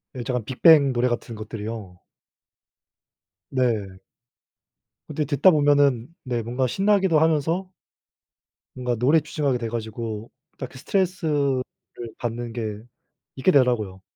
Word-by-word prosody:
예, 120 - -4
저 125 - -3
약간 120 -4 -2
빅뱅 140 +1 +5
노래 120 +1 +1
같은 120 -1 -4
것들이요. 110 -3 -7 1.5
네. 110 -7 -1 1.1
근데 150 0 -2
듣다 145 +6 +4
보면은 145 -5 +3 0.2
네 125 -3 -2
뭔가 125 +3 -1
신나기도 195 - +2
하면서 160 +4 +1 1.1
뭔가 125 -1 -2
노래에 140 +8 +3
집중하게 145 -4 -1
돼 115 -1 -4
가지고 110 -1 -5 0.3
딱 130 - -6
그 135 - -13
스트레스를 150 -7 0 0.5
받는 120 0 -4
게 110 -3 -4 0.6
잊게 140 +8 +2
되더라고요. 115 - +2
125 Hz, 265 characters per minute, -24 LUFS, 115-150 Hz, 1.5 s, 빅뱅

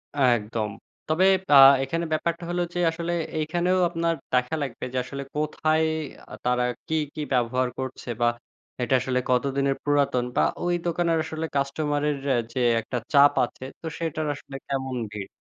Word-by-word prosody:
একদম, 115 -5 +1 0.4
তবে 165 +4 +3 0.3
আ - - +9 0.3
এখানে 165 +5 -2
ব্যাপারটা 170 +2 -1
হলো 175 0 0
যে 175 - -2
আসলে 170 +1 -4 0.3
এখানেও 175 +4 +1
আপনার 165 -1 0 0.2
দেখা 125 +5 +2
লাগবে 125 -3 -4
যে - - -1
আসলে 140 0 -6
কোথায় 155 +1 +1 0.6
তারা 125 0 +2 0.2
কি, 160 - -1 0.2
কি 155 - -4
ব্যবহার 125 +1 +1
করছে 130 -1 -6
বা 120 - +4 0.5
এটা 125 - 0
আসলে 125 -1 0
কতদিনের 135 +2 +1
পুরাতন 140 -4 +2
বা - - +3 0.2
ওই 175 0 +1
দোকানের 170 -1 +1
আসলে 160 0 -4
কাস্টমার 145 +1 0
এর 140 - -3 0.4
যে 130 - -2 0.2
একটা 125 +3 -4 0.2
চাপ 145 0 +7
আছে, 130 - -12 0.2
তো - - -10
সেটার 160 -2 -2
আসলে 140 -1 -11
কেমন 135 -2 -2 0.2
ভিড়? 100 -2 -6
140 Hz, 155 wpm, -25 LUFS, 130-160 Hz, 0.6 s, আ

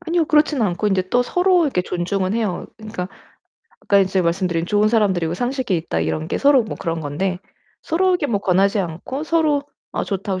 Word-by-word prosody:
아니요. 340 -1 0
그렇진 300 -4 +2
않고 200 +1 0
인제 185 -1 0
또 245 0 +3
서로 360 +4 +2
이렇게 185 -11 0
존중은 185 +3 -2
해요. 215 -6 -2
그러니까 215 -4 -6 0.7
아까 200 - +3
인제 190 -1 +2
말씀드린 170 -1 0
'좋은 210 +2 +2
사람들이고 190 -7 +1
상식이 245 -3 -1
있다.' 85 - -2
이런 80 -1 -2
게 - - -1
서로 280 -3 +5
뭐 215 - -6
그런 165 -1 -3
건데 175 +5 -2 0.4
서로에게 360 -2 +1
뭐 205 -6 -1
권하지 195 +2 +2
않고 185 - -5
서로 310 -4 +2 0.3
어 - - -2
좋다고 195 -1 -3
200 Hz, 410 characters per minute, -20 LUFS, 180-270 Hz, 0.7 s, 서로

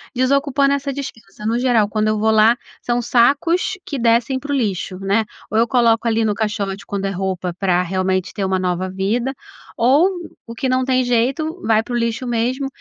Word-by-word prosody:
Desocupando 275 +2 +2
essa 280 0 -2
despensa, 220 -7 -8
no 230 +2 +1
geral, 240 -5 +3
quando 215 0 0
eu 215 - +1
vou 220 +1 +2
lá, 220 +2 +5 0.2
são 240 0 0
sacos 290 +10 +2
que 280 -4 -4
descem 235 +3 +2
para 290 +2 -6
o - - +1
lixo, 195 -6 -2
né, 200 +3 +1 0.3
ou 215 - 0
eu 235 - +3
coloco 235 -2 +2
ali 225 0 +1
no 210 - +1
caixote, 205 -2 -3
quando 200 -1 -3
é 195 - -1
roupa 185 -2 -3
pra, 180 -2 +2
realmente, 185 0 -1
ter 200 - -3
uma 190 0 +1
nova 185 0 -1
vida, 220 +8 -1 0.4
ou, 280 +10 +4 0.4
o 230 - -8
que 260 - -2
não 255 0 +2
tem 255 -1 +2
jeito, 270 +8 0
vai 220 0 +3
para 245 - -7
o - - +1
lixo 235 +2 -1
mesmo. 245 +4 -1
230 Hz, 200 wpm, -19 LUFS, 200-260 Hz, 0.4 s, lá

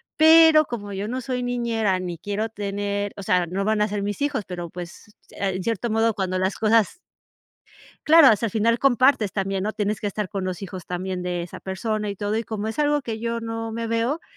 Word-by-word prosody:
Pero, 320 -1 +7
como 205 -6 -6
yo 195 +2 -3
no 255 +3 -3
soy 250 0 -3
niñera 230 -6 0
ni 175 -2 -5
quiero 205 +5 -3
tener, 205 -1 -3
o 200 - -6
sea, 180 -1 +2
no 190 +4 -2
van 215 0 +1
a 210 - +3
ser 205 -1 -3
mis 205 +7 -4
hijos, 280 -8 -1
pero 175 -2 -6
pues, 175 +5 -10
se - - -20 0.2
en 185 - -5
cierto 230 +1 -1
modo, 225 0 +2
cuando 190 -3 -2
las 190 +1 0
cosas 225 - +2 1.1
Claro, 315 -4 +8
o 215 - +4
sea, 230 - -1
al - - -7
final 230 +3 +2
compartes 255 -5 +3
también, 195 -1 -1
¿no? 215 - -2
Tienes 210 0 -1
que 210 - -2
estar 205 -1 -3
con 195 -3 -3
los 185 0 -4
hijos, 185 -2 -7
también 180 0 -4
de 180 -1 -2
esa 175 - -9
persona, 210 +2 -3
y 200 - -4
todo. 205 +2 -2
Y 225 - -1
como 215 0 -3
es 225 - -5
algo 295 0 +2
que 225 -4 -5
yo 230 0 -2
no 225 0 -4
me 230 0 -3
veo, 230 +8 0
215 Hz, 230 wpm, -23 LUFS, 195-230 Hz, 1.1 s, Claro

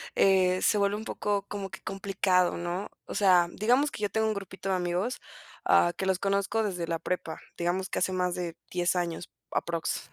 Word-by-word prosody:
eh, 185 -1 +4
se 210 - +3
vuelve 200 0 +2
un 220 - -7
poco 205 -1 -1
como 200 -1 -5
que 190 - -9
complicado, 190 -2 +1
¿no? 175 +3 -3 0.2
O - - -6
sea, 180 -4 +5
digamos 250 +7 +2
que 210 - -6
yo 205 - +1
tengo 220 +1 +1
un 220 - +1
grupito 195 -1 -6
de 190 - +2
amigos, 180 +7 -1 0.5
ah, 175 - +5
que 190 - -2
los 190 -1 +1
conozco 200 +3 +1
desde 180 -5 -2
la 165 -1 -1
prepa, 175 -2 -3 0.2
digamos 180 +2 -1
que - - -1
hace 185 - +1
más 180 -1 0
de 175 -2 -4
10, 175 0 +1
años 175 -1 -2 0.2
aproximadamente, 170 -1 -2
190 Hz, 200 wpm, -29 LUFS, 175-200 Hz, 0.5 s, sea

